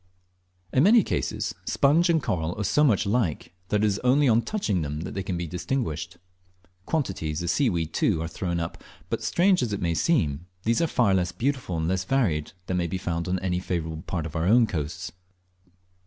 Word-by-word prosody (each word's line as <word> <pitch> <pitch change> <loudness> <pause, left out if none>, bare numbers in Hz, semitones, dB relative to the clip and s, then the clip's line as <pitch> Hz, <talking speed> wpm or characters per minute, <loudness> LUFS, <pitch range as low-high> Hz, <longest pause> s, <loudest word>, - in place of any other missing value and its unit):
In 130 - +4
many 215 +6 +6
cases - - -2
sponge 160 +5 +3
and 160 -3 +2
coral 90 -2 -2
are - - 0
so 145 +9 +3
much 115 -10 +3
alike 100 -7 -1
that 105 +2 +1
it - - +5
is 105 -1 +1
only 135 +3 +3
on 115 -1 +4
touching 115 - -1
them 75 0 -3
that 90 - -6
they 95 - -3
can 95 -2 -3
be 85 - -3
distinguished. 90 - -3 0.7
Quantities 90 - -2
of 85 - 0
seaweed, 85 - 0
too, - - +1
are 80 - -2
thrown 85 +1 -3
up; 80 - -5 0.3
but - - -1
strange 185 0 +3
as 115 -4 -1
it 100 - -2
may 85 -3 0
seem, 85 - +1 0.2
these 115 +5 +2
are 165 - +2
far 120 -9 +2
less 90 -2 +1
beautiful 125 -9 -2
and 80 0 -1
less 95 +1 0
varied 95 - 0
than 90 - -1
may 85 -1 0
be 95 - -3
found 85 -2 -3
on 90 +1 0
any 90 -1 0
favourable 80 -3 -3
part 85 -3 -2
of 80 - -7
our 80 +1 0
own 115 +3 +6
coasts. 85 -3 -4
95 Hz, 205 wpm, -26 LUFS, 85-125 Hz, 0.7 s, many